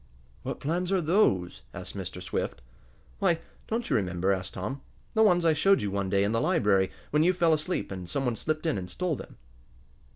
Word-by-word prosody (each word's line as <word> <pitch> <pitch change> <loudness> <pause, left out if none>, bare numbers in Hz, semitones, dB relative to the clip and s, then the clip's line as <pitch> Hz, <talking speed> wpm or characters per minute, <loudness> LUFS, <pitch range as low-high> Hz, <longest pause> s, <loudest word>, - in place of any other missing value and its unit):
"What - - -4
plans 175 +5 -1
are 195 - +3
those?" 125 - +2
asked - - -7
Mr. - - -5
Swift. - - -2 0.6
"Why, 180 -4 +3 0.3
don't 230 +2 -1
you - - +1
remember?" 95 -2 +1
asked 95 0 -4
Tom. 105 +9 -4 0.3
"The 220 - +3
ones 175 -5 +5
I 160 - +5
showed 195 - +3
you 100 - -1
one 100 -1 -1
day, 100 +1 +3
in 100 - +1
the 115 0 +1
library, 95 -2 +3 0.2
when 150 - +3
you 180 +3 +4
fell 170 -2 +3
asleep, 155 - -1
and 90 -2 -6
some 135 +9 -1
one 120 -2 +1
slipped 155 +6 -2
in 155 -11 +1
and 90 -1 -6
stole 175 - -1
them." - - -10
140 Hz, 205 wpm, -28 LUFS, -, 0.6 s, ones